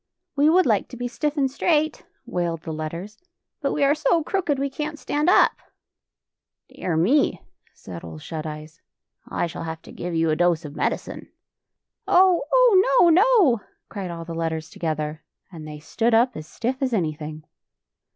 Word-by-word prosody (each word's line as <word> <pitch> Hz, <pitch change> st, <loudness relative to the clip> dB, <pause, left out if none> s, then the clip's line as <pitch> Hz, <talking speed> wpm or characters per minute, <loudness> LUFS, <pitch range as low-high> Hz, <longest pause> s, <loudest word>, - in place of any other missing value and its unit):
"We 290 Hz, +2 st, +4 dB
would 365 Hz, +3 st, +4 dB
like 215 Hz, -4 st, +2 dB
to 250 Hz, -, -10 dB
be 245 Hz, +1 st, -3 dB
stiff 295 Hz, +4 st, -3 dB
and 270 Hz, -2 st, +1 dB
straight," 310 Hz, +2 st, 0 dB, 0.2 s
wailed 170 Hz, -2 st, -3 dB
the 160 Hz, -, -5 dB
letters, 170 Hz, +7 st, -6 dB, 0.2 s
" -, -, -61 dB
but 275 Hz, -, 0 dB
we 290 Hz, -, 0 dB
are 280 Hz, +1 st, +5 dB
so 315 Hz, +2 st, +1 dB
crooked 340 Hz, -5 st, -1 dB
we 275 Hz, +1 st, 0 dB
can't 300 Hz, +3 st, -5 dB
stand 300 Hz, +2 st, 0 dB
up." -, -, +6 dB, 0.6 s
" -, -, -65 dB
Dear 170 Hz, -3 st, -3 dB
me! 255 Hz, -, +2 dB
" -, -, -55 dB
said 90 Hz, -2 st, -10 dB
Ole 80 Hz, -2 st, -8 dB
Shut 155 Hz, -, -6 dB
Eyes, 155 Hz, +1 st, -9 dB, 0.3 s
" -, -, -59 dB
I -, -, -1 dB
shall 170 Hz, -, -6 dB
have 160 Hz, 0 st, -6 dB
to -, -, -13 dB
give 175 Hz, -1 st, -5 dB
you 165 Hz, -1 st, +2 dB
a -, -, +2 dB
dose 170 Hz, -1 st, +1 dB
of 145 Hz, 0 st, -8 dB
medicine." -, -, -3 dB, 0.8 s
"Oh, 365 Hz, -1 st, +5 dB
oh; 435 Hz, -, +5 dB
no, 345 Hz, -, +7 dB
no!" 365 Hz, -, +4 dB, 0.3 s
cried 195 Hz, -4 st, -5 dB
all 165 Hz, -1 st, -6 dB
the 165 Hz, -, -6 dB
letters 160 Hz, -1 st, -3 dB
together, 155 Hz, -1 st, -3 dB, 0.3 s
and 160 Hz, -3 st, -9 dB
they 150 Hz, 0 st, -7 dB
stood 225 Hz, +9 st, 0 dB
up 240 Hz, +3 st, +3 dB
as 155 Hz, 0 st, -8 dB
stiff 255 Hz, -, -3 dB
as 260 Hz, -2 st, 0 dB
any 165 Hz, -8 st, 0 dB
thing. 155 Hz, 0 st, -8 dB
200 Hz, 190 wpm, -23 LUFS, -, 0.8 s, no